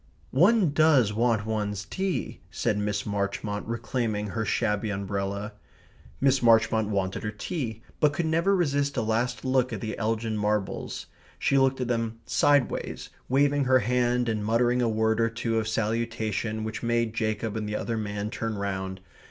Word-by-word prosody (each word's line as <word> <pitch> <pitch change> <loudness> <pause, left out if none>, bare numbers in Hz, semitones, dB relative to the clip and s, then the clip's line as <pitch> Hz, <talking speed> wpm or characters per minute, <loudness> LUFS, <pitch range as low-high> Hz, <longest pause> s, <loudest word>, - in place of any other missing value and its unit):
"One 180 - +4
does 145 -8 +4
want 115 -1 +1
one's 105 -2 -2
tea," 190 - -3
said 105 - -1
Miss 105 0 -1
Marchmont, 105 0 -2
reclaiming 115 -2 -2
her 115 +3 -2
shabby 105 0 0
umbrella. 100 +1 -3 0.7
Miss 135 -1 +3
Marchmont 110 -2 +4
wanted 95 -2 -1
her 105 - -2
tea, 115 - -4 0.2
but 150 - +4
could 165 +4 -2
never 165 +5 +2
resist 140 -5 0
a 115 - +1
last 115 +4 -1
look 130 -1 +2
at 110 - -3
the 110 +2 -4
Elgin 110 0 -1
Marbles. 105 -1 -2 0.3
She 135 - +2
looked 135 0 +2
at 125 - -1
them 115 -2 -1
sideways, 145 -4 +1 0.2
waving 140 +1 +3
her 130 0 +5
hand 125 +1 +1
and 110 -2 -1
muttering 120 +3 +2
a 120 - +2
word 110 +1 +1
or 115 - +3
two 115 0 -1
of 110 - -2
salutation 110 0 -1
which 110 0 -4
made 115 -1 0
Jacob 110 -1 -2
and 105 -1 -3
the 105 - -2
other 115 +2 -2
man 105 -1 -3
turn 115 -3 -3
round. 95 -1 -3
115 Hz, 165 wpm, -27 LUFS, 105-125 Hz, 0.7 s, her